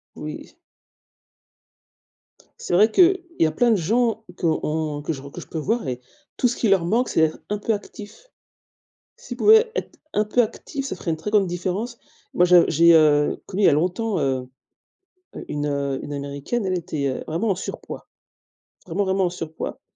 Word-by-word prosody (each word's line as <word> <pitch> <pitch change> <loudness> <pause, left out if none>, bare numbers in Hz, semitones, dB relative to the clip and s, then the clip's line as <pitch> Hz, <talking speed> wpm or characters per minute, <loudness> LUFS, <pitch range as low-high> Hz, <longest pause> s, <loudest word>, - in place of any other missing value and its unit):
Oui. 150 0 -8 2.0
C'est - - -3
vrai 210 +5 +5
qu'il 370 - +5 0.2
y 165 - +4
a - - 0
plein 240 +10 +2
de 220 - +4
gens 225 +5 0
qu'on 155 -3 -1
que 155 - -2
je 135 -3 -8
re 140 - -10
que - - -9
je - - -11
peux 160 - -5
voir 225 +10 -1
et 125 -1 -4 0.4
tout 250 - +2
ce 240 - -3
qui 225 - 0
leur 195 -3 +3
manque, 230 +8 +1
c'est - - +1
d'être 155 - -2
un 210 - -1
peu 220 +2 0
actif. 210 - -10 0.9
S'ils - - -9
pouvaient 445 +2 +6
être - - -5 0.2
un 210 - +2
peu 230 +4 +3
actif, 270 +5 -4
ça 270 - -4
ferait 170 - -3
une 160 - -2
très 205 +6 -5
grande 205 -3 +3
différence. 185 +7 -3 0.4
Moi 180 - +4
j'ai 175 -1 +7
j'ai, 170 +2 +5
heu, 150 -2 +4
connu 200 +2 -2
il - - +6
y - - +8
a - - +3
longtemps, 185 +8 0
heu, 130 -2 -1 1.0
une 150 0 -2 0.4
une 145 - -7
Américaine, 140 - -3
elle 185 -1 0
était, 155 -4 -3
heu, 130 - -4
vraiment 185 +8 -1
en - - +2
surpoids. 180 - -7 0.8
Vraiment 185 +3 -1
vraiment 190 0 +1
en - - -1
surpoids. 165 -3 -6
180 Hz, 190 wpm, -23 LUFS, 155-225 Hz, 2.0 s, y